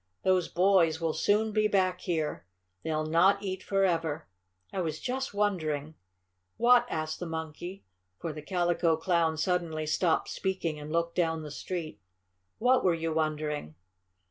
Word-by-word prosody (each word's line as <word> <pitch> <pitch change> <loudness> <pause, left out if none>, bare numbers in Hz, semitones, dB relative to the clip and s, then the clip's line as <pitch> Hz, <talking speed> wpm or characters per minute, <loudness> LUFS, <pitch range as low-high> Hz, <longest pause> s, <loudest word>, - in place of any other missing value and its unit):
"Those 185 -2 +3
boys 175 -3 +3
will 165 -2 0
soon 215 +2 +2
be 215 0 +3
back 185 -3 +1
here. 155 - -2 0.3
They'll 155 -1 -1
not 185 +6 +4
eat 190 -1 -3
forever. 165 -6 0 0.5
I 190 - -1
was 160 -3 -3
just 265 +1 -3
wondering 160 -8 -1 0.3
" - - -52 0.3
"What?" 245 0 +5
asked 155 0 -3
the 175 - -4
Monkey, 160 +3 -6 0.3
for 160 - -4
the 150 - -7
Calico 175 -1 +1
Clown 165 -2 +1
suddenly 165 -2 0
stopped 160 +2 +1
speaking 180 -5 -2
and 150 +1 -7
looked 170 +1 0
down 165 -2 0
the 150 - -7
street. 155 - -5 0.6
"What 250 +2 +3
were 180 -3 +3
you 165 0 -2
wondering?" 150 - -2
170 Hz, 150 wpm, -29 LUFS, 155-190 Hz, 0.6 s, What